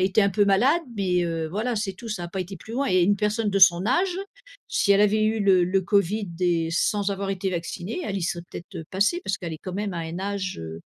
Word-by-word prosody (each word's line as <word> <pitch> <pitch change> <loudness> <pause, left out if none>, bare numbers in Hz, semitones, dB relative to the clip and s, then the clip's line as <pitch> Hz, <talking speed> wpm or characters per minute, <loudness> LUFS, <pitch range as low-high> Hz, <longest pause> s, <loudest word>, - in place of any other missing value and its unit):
a - - +2
été 190 +3 +3
un 200 - +3
peu 205 +2 +3
malade, 255 - +3
mais, 180 -3 +1
heu, 165 -1 -2
voilà, 220 +6 -2
c'est 205 -2 -2
tout, 230 +4 -10
ça 190 -5 -3
a - - -6
pas 190 +2 -4
été 190 +2 -6
plus 220 +6 -11
loin. 275 +2 0
Et 185 -1 +4
une 205 +3 +3
personne 210 +1 0
de 195 - +1
son 180 0 +6
âge, 350 - +1 0.5
si 200 - +1
elle 200 - +4
avait 215 +1 +3
eu 220 0 +1
le 190 -3 +4
le 190 +2 +1
covid 200 +2 +1
et 170 -2 +1
sans 205 +3 +1
avoir 195 0 -3
été 190 0 -2
vaccinée, 175 - -4
elle 200 -1 -3
y 190 - -3
serait 170 0 -2
peut-être, 175 - -8
heu, 160 - -6
passée, 205 - +1
parce 195 - -1
qu'elle 170 -3 -5
est - - -9
quand 185 - -5
même 200 -2 -3
à - - -3
un 165 +2 -5
âge, 195 -2 -3
heu, 80 0 -7
195 Hz, 270 wpm, -25 LUFS, 175-210 Hz, 0.5 s, son